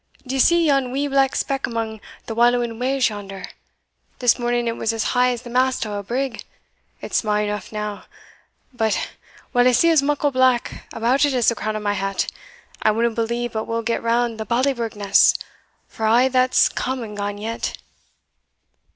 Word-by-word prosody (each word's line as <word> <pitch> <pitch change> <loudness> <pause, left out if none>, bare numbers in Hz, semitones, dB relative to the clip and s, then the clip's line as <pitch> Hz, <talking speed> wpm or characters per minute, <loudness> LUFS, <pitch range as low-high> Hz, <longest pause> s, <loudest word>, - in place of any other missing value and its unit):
D'ye 265 +1 -2
see 340 +5 +4
yon 275 -4 +2
wee 275 +2 -1
black 275 -1 +2
speck 275 -1 -1
amang 225 -2 -4 0.2
the 225 - -5
wallowing 240 0 +2
waves 260 -1 +1
yonder? 195 -2 -7 0.7
This 245 0 +3
morning 240 0 0
it 230 - -1
was 225 - -1
as 225 -1 -1
high 250 0 +3
as 245 -1 -3
the 240 - -9
mast 255 -1 +1
o' 210 - -5
a 205 - -3
brig 245 +4 -3 0.6
it's - - -2
sma' 210 -1 +1
eneugh 210 -1 -4
now 210 -1 -5 0.7
but, 220 -3 -1 0.4
while 245 0 +4
I 250 - +4
see 335 +8 +4
as 315 -3 +5
muckle 290 0 0
black 255 -2 +1
about 240 +5 +1
it 285 -2 +2
as 240 -3 +3
the - - +1
crown 215 -1 -3
o' - - -2
my 205 -1 0
hat, 195 0 -1 0.6
I - - +3
winna 230 +2 +1
believe 235 +1 -2
but 220 0 -2
we'll 230 0 -2
get 230 +1 -1
round 230 -1 0
the 220 - -3
Ballyburgh 240 -2 0
Ness, 200 -1 +4 0.5
for 220 - -3
a' 240 +4 +5
that's 255 0 +4
come 260 -1 -3
and 210 -2 -8
gane 205 0 -3
yet." 225 +2 -4
235 Hz, 185 wpm, -21 LUFS, 220-255 Hz, 0.7 s, as